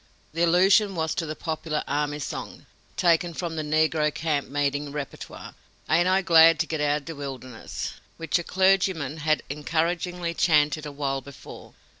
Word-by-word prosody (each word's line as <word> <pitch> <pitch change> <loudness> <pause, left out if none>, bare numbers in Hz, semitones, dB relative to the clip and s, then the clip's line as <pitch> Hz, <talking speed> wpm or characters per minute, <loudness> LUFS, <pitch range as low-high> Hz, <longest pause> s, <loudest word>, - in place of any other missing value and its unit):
The 165 - -2
allusion 190 +4 +4
was 160 -1 -1
to 165 0 -3
the 155 - -4
popular 155 -1 -3
army 145 +1 -1
song, 150 - -6 0.3
taken 170 -1 +2
from 170 -1 -4
the 155 - -2
negro 155 0 +1
camp 150 -3 -2
meeting 145 0 -1
repertoire: 145 -1 -7 0.4
"Ain't 170 +3 +4
I 190 +1 +3
glad 165 -2 +7
to - - 0
git 160 -2 -3
out 145 0 +1
o' - - -25
de 165 - -6
Wilderness," 130 -4 -6 0.2
which 165 +1 0
a - - -4
clergyman 185 -6 +1
had 155 0 0
encouragingly 170 +4 -2
chanted 155 -2 +2
awhile 140 -2 -3
before. 140 +1 -12
160 Hz, 160 wpm, -25 LUFS, 145-170 Hz, 0.4 s, glad